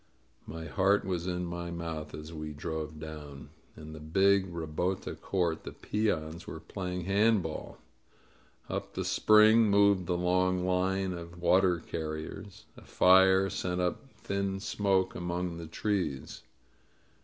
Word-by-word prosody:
My 80 +1 -7
heart 95 +6 +2
was 90 -2 -2
in 90 0 -2
my 85 0 -5
mouth 80 -2 -5
as 75 +2 -9
we 75 -1 -6
drove 80 0 -5
down. 75 -3 -9 0.3
In 80 0 -9
the 80 - -8
big 95 +4 +2
ribota 85 +3 -3
court 85 -4 -1
the - - -7
peons 85 -6 -2
were - - -6
playing 90 -1 -5
hand 100 +2 +3
ball. 80 -1 -6 0.9
Up - - -5
from - - -2
the - - -7
spring 110 +1 +5
moved 100 -2 +4
the 90 -1 0
long 90 +1 +1
line 95 +1 0
of 85 0 -9
water 90 0 +4
carriers. 80 +4 -6
A - - -14
fire 95 +1 +5
sent 90 -2 -2
up 90 +9 -2
thin 100 0 -2
smoke 95 -2 0
among 85 0 -3
the 85 -1 -7
trees. 85 -6 -2
90 Hz, 145 wpm, -30 LUFS, 80-95 Hz, 0.9 s, spring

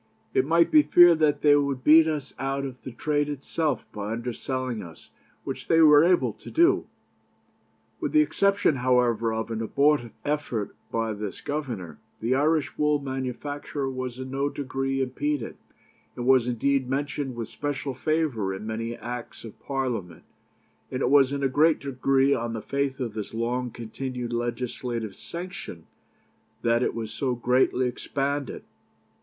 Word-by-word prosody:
It 130 - +2
might 165 +1 +4
be 310 -1 +8
feared 175 - +6
that 145 -2 +2
they 145 -1 +7
would 140 -3 0
beat 160 +1 +7
us 150 -3 -3
out 135 +1 -2
of 130 -2 -8
the 130 - -7
trade 145 +4 0
itself 145 -1 -2
by 105 0 -4
underselling 125 +1 -3
us, 85 -2 -13 0.3
which - - -6
they 165 - +4
were 150 -2 +8
able 165 - +3
to - - -12
do.' 340 +2 +3 1.1
With - - -2
the 310 - +5
exception, 200 - +2
however, 120 -3 +2
of 110 +1 -3
an 115 0 -2
abortive 140 +2 +2 0.2
effort 145 -8 -2 0.2
by 115 -1 -1
this 105 -1 -6
governor, 125 - -5 0.2
the 115 +3 0
Irish 145 +1 +1
wool 150 0 +3
manufacture 135 +1 -4
was 130 -2 -4
in 130 0 -6
no 140 +1 0
degree 135 -1 -2
impeded, 135 0 -2 0.6
and 120 - -4
was 130 -2 +5
indeed 130 +2 0
mentioned 140 -1 -2
with 115 -1 -4
special 145 -2 -3
favour 130 -9 -1
in 100 - -7
many 115 +1 -3
Acts 120 0 -7
of 115 -3 -11
Parliament; 125 -10 -3 0.7
and 130 - -2
it 125 - +1
was 140 -2 +6
in 140 0 -2
a - - +4
great 150 +4 +3
degree 135 0 +2
on 115 -2 -2
the 110 - -4
faith 140 -1 -2
of 120 -4 -3
this 110 0 -6
long 120 +2 -1
continued 120 +1 -5
legislative 120 -2 -3
sanction 170 - -7 0.8
that 115 0 +3
it - - 0
was 115 -2 -4
so 130 -3 -1
greatly 125 +1 +2
expanded. 140 +2 -3
130 Hz, 160 wpm, -26 LUFS, 120-145 Hz, 1.1 s, be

